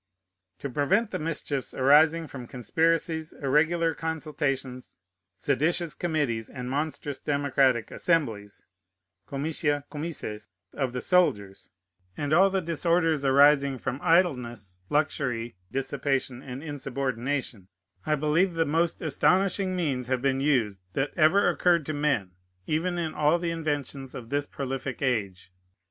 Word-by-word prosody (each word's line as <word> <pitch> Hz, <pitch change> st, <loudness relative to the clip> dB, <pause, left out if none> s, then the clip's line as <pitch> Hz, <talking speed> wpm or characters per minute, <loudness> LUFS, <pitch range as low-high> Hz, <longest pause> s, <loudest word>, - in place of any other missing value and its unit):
To -, -, -5 dB
prevent 180 Hz, -, +1 dB
the -, -, -3 dB
mischiefs 155 Hz, -4 st, -3 dB
arising 155 Hz, +5 st, +5 dB
from 130 Hz, -5 st, -9 dB
conspiracies, 160 Hz, +5 st, 0 dB
irregular 160 Hz, +4 st, +2 dB
consultations, 145 Hz, -5 st, -3 dB, 0.4 s
seditious 155 Hz, -, 0 dB
committees, 145 Hz, -10 st, -1 dB
and 125 Hz, -1 st, -6 dB
monstrous 145 Hz, -1 st, -3 dB
democratic 140 Hz, -4 st, +1 dB
assemblies 115 Hz, -, -1 dB, 0.6 s
[comitia, 145 Hz, 0 st, -1 dB
comices] 145 Hz, -9 st, -5 dB, 0.3 s
of 130 Hz, -3 st, -2 dB
the 125 Hz, -, -3 dB
soldiers, 105 Hz, -, +1 dB, 0.5 s
and 145 Hz, +1 st, -1 dB
all 190 Hz, +4 st, +6 dB
the 190 Hz, -1 st, -1 dB
disorders 165 Hz, -2 st, +1 dB
arising 140 Hz, 0 st, +5 dB
from 125 Hz, +2 st, -4 dB
idleness, 120 Hz, -, +1 dB
luxury, 125 Hz, -, -1 dB, 0.2 s
dissipation, 135 Hz, -1 st, -2 dB
and 135 Hz, +1 st, -8 dB
insubordination, 135 Hz, -, -3 dB, 0.4 s
I 155 Hz, -, +1 dB
believe 155 Hz, +5 st, +1 dB
the 165 Hz, 0 st, +2 dB
most 165 Hz, +3 st, 0 dB
astonishing 185 Hz, +5 st, +2 dB
means 135 Hz, -8 st, -1 dB
have 130 Hz, 0 st, -1 dB
been 135 Hz, -1 st, +1 dB
used 120 Hz, -9 st, +1 dB
that 135 Hz, +1 st, -1 dB
ever 170 Hz, +5 st, +4 dB
occurred 170 Hz, -4 st, +2 dB
to 155 Hz, -, -3 dB
men, 140 Hz, -11 st, 0 dB, 0.3 s
even 170 Hz, -, -1 dB
in 165 Hz, -2 st, -2 dB
all 150 Hz, +3 st, +3 dB
the 170 Hz, -1 st, -2 dB
inventions 145 Hz, -5 st, -3 dB
of 115 Hz, -2 st, -8 dB
this 145 Hz, +1 st, -1 dB
prolific 135 Hz, 0 st, -4 dB
age. 100 Hz, -7 st, -2 dB
145 Hz, 125 wpm, -27 LUFS, 130-160 Hz, 0.6 s, all